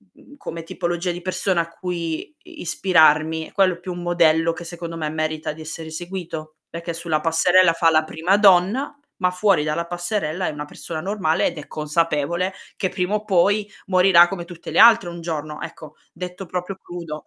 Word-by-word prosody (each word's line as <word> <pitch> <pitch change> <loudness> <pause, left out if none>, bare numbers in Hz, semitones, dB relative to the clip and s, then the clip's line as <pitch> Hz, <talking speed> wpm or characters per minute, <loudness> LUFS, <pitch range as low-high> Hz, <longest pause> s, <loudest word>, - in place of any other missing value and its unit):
mhmm, 285 - -17
come 165 - -7
tipologia 175 +1 -2
di 175 +1 -6
persona 185 0 0
a 165 - -5
cui 170 - -4
i 350 -3 -12
ispirarmi, 160 -3 +3
è - - -18
quello 185 -3 +2
più 180 +1 -6
un 175 - -7
modello 165 -1 +3
che 170 +2 -8
secondo 170 0 -7
me 155 -2 -2
merita 155 0 -2
di 160 - -12
essere 160 0 -6
seguito, 160 -2 -6
perché 170 +1 -5
sulla 165 -2 -1
passerella 170 +2 +4
fa 165 0 +3
la 155 0 +4
prima 165 +5 +1
donna, 200 +6 +4 0.2
ma 180 -1 +1
fuori 180 -3 +2
dalla 155 +2 -1
passerella 175 0 -2
è - - -1
una 150 0 -6
persona 155 +2 -7
normale 185 -4 0
ed - - -5
è 150 - -8
consapevole 165 +3 -1 0.2
che 190 - 0
prima 185 +2 -1
o 210 0 -3
poi 205 +2 +2 0.2
morirà 180 -2 +6
come 175 -2 -5
tutte 170 -1 -9
le - - +1
altre 225 -5 +7
un 170 0 -8
giorno. 155 -2 -5
Ecco, 160 -2 -9 0.2
detto 180 +2 -7
proprio 180 +2 -4
crudo. 170 -5 -8
170 Hz, 190 wpm, -22 LUFS, 160-185 Hz, 0.2 s, altre